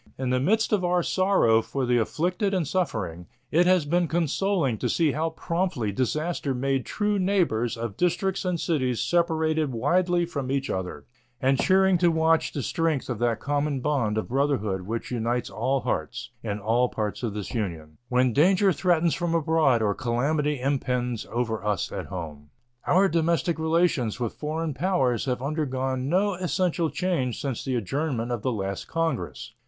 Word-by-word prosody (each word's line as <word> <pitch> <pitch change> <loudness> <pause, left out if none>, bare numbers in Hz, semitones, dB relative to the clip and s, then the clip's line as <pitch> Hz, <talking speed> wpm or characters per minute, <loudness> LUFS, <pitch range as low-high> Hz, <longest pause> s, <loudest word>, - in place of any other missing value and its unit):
In 130 -1 -2
the 130 - +2
midst 220 - +2
of 200 -3 +2
our 175 0 +2
sorrow 185 - +3
for 135 +3 -3
the 120 0 +3
afflicted 180 - 0
and 175 -6 0
suffering, 100 - -2 0.2
it 175 +3 +4
has 185 -4 +4
been 175 +3 +1
consoling 165 - 0
to - - -1
see 160 -3 +2
how 160 +4 -1
promptly 165 - -2
disaster 140 - -1
made 135 +1 -1
true 210 -1 0
neighbors 170 - +1
of 115 -3 -5
districts 185 +2 0
and 180 -2 -1
cities 130 -9 0
separated 160 -3 +1
widely 175 +8 +1
from 140 -6 -4
each 135 0 -1
other, 90 -6 -4 0.3
and 135 0 +2
cheering 190 -1 +4
to 175 - +4
watch 160 0 +2
the 140 - -4
strength 160 -3 -1
of 115 - -4
that 120 -1 +1
common 145 -1 -1
bond 125 -6 0
of 110 - -2
brotherhood 125 -8 0
which 115 +3 -4
unites 120 0 -1
all 135 0 0
hearts, 120 0 -3
in 105 -2 -3
all 115 +4 +2
parts 105 -2 -3
of 115 -4 -3
this 105 -2 -5
Union, 85 -9 -4
when 125 -1 +2
danger 185 - +4
threatens 170 0 +2
from 170 -1 -1
abroad 155 -7 +3
or 100 -1 +2
calamity 140 +6 0
impends 125 -3 -1
over 110 -3 -2
us 105 -4 -1
at - - -5
home. 75 -6 -7 0.4
Our 190 +2 +5
diplomatic 165 -1 +1
relations 160 -8 +1
with 120 -3 -2
foreign 155 +1 -3
powers 135 - +1
have 125 -1 -2
undergone 135 -3 -2
no 195 +4 +2
essential 180 -2 0
change 155 - -1
since 135 -5 -3
the 130 -2 -1
adjournment 125 - -2
of 120 -3 -2
the 130 - 0
last 100 -3 -4
Congress. 130 -7 -3
140 Hz, 170 wpm, -26 LUFS, 120-170 Hz, 0.4 s, Our